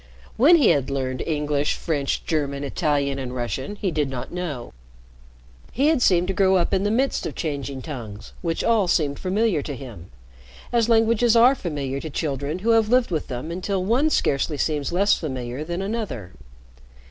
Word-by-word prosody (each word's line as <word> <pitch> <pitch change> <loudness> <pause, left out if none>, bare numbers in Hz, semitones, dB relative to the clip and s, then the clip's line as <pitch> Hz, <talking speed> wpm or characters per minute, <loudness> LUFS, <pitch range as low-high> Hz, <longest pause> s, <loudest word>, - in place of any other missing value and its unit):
When 295 +9 +6
he 295 -8 +5
had 140 -1 +2
learned 130 -2 -2
English, 150 -2 0
French, 145 -5 -2
German, 145 -3 -1
Italian, 140 -2 0
and 125 -1 -5
Russian 130 - -3
he 200 -3 -2
did 150 -3 0
not 125 -2 -6
know. 160 -9 -5 1.0
He 280 +5 +3
had 315 -5 +2
seemed 180 -5 +3
to - - +1
grow 190 0 +3
up 175 -2 +1
in 190 0 +2
the 205 - +1
midst 260 +5 0
of - - -7
changing 140 -4 -4
tongues 115 -9 -8
which 165 -1 -2
all 225 -5 +3
seemed 145 -5 +1
familiar 195 -3 +1
to 145 0 -5
him, 115 -10 -10 0.6
as 235 -1 +2
languages 230 +1 +4
are 240 +3 +7
familiar 145 - -4
to 160 - -6
children 145 +1 -3
who 230 - +4
have 225 -2 +3
lived 250 -3 +3
with 160 -3 -2
them 130 +5 -5
until 185 +1 -2
one 255 +9 +2
scarcely 145 - 0
seems 150 -1 -1
less 200 +4 +3
familiar 130 -2 -4
than 175 +4 -4
another. 195 - -4
160 Hz, 180 wpm, -23 LUFS, 140-205 Hz, 1.0 s, are